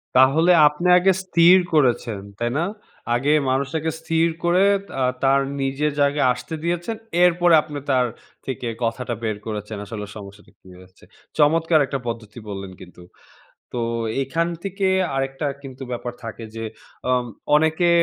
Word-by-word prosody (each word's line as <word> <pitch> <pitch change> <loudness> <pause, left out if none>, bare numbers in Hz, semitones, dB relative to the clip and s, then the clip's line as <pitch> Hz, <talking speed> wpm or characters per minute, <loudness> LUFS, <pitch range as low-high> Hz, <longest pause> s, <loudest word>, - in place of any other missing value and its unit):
তাহলে 140 +7 +5 0.2
আপনে 150 +5 -1
আগে 185 +2 +4
স্থির 175 0 +6 0.2
করেছেন, 120 -8 +1 0.2
তাই 120 0 -1
না? 160 - +1 0.5
আগে 140 +5 +1 0.2
মানুষটাকে 150 +4 -1
স্থির 165 0 +1 0.2
করে 175 +2 +3 0.3
তা 135 - -4 0.2
তার 135 0 +4 0.2
নিজের 135 +3 0
জায়গায় 140 0 +2
আসতে 160 +6 -7
দিয়েছেন, 175 +6 -2 0.3
এরপরে 175 -1 +4
আপনি 150 -1 -8
তার 125 -1 +3 0.4
থেকে 130 -2 -4 0.2
কথাটা 120 +1 -2
বের 110 -2 -1
করেছেন, 105 -1 -5
আসলে 105 0 -6
সমস্যাটা 100 0 -12
কি 95 - -18
হয়েছে? 95 0 -19 0.3
চমৎকার 160 +2 +4
একটা 135 0 -3
পদ্ধতি 115 -1 -6
বললেন 95 -1 -6
কিন্তু। 90 0 -13 0.7
তো 120 - -2 0.4
এখান 165 +6 -1 0.2
থেকে 195 0 -1 0.3
আরেকটা 135 +2 -2 0.2
কিন্তু 135 -1 -9
ব্যাপার 120 0 -4
থাকে 115 0 -7
যে, 115 - -5 0.5
আম 125 -1 +1 0.3
অনেকে 160 +3 +3
135 Hz, 145 wpm, -22 LUFS, 115-165 Hz, 0.7 s, স্থির